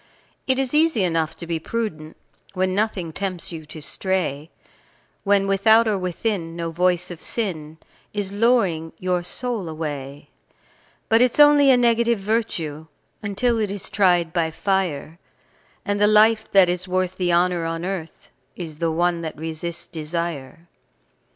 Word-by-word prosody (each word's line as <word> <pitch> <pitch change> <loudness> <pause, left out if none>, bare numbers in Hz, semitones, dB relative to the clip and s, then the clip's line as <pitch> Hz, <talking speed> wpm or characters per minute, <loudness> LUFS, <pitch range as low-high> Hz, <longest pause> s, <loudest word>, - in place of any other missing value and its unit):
It 260 -1 +2
is 265 -1 -1
easy 310 -8 +3
enough 165 -3 0
to 170 - -8
be 165 -1 -2
prudent 160 -6 -4 0.4
When 185 0 0
nothing 190 -5 -1
tempts 185 -2 -4
you 160 -2 -8
to 155 -1 -9
stray, 165 -5 -2 0.7
When 200 -1 +3
without 220 +4 +4
or 215 - +2
within 180 -2 -3
no 170 -1 -3
voice 180 +1 +1
of 165 -2 -10
sin 160 -9 -2 0.3
Is 200 -1 -3
luring 200 -8 +1
your 180 -1 -1
soul 215 0 -4
away; 145 -3 -6 0.8
But 225 +1 +4
it's 250 +3 +2
only 290 -1 +7
a 260 - +6
negative 235 -1 +3
virtue 190 -8 -2 0.3
Until 225 +3 0
it 210 -2 0
is 200 0 -6
tried 175 -4 +2
by 165 -2 +1
fire, 170 -3 -2 0.7
And 205 0 -1
the 210 - +6
life 215 +1 +4
that 195 -2 +6
is 180 +1 -2
worth 185 0 -1
the 180 -2 0
honour 175 0 +2
on 165 +1 -3
earth 185 -4 -6 0.2
Is 160 -4 -7
the 165 - +1
one 170 +1 +1
that 160 -2 -6
resists 165 +2 -4
desire. 165 -1 -5
180 Hz, 150 wpm, -22 LUFS, 165-210 Hz, 0.8 s, only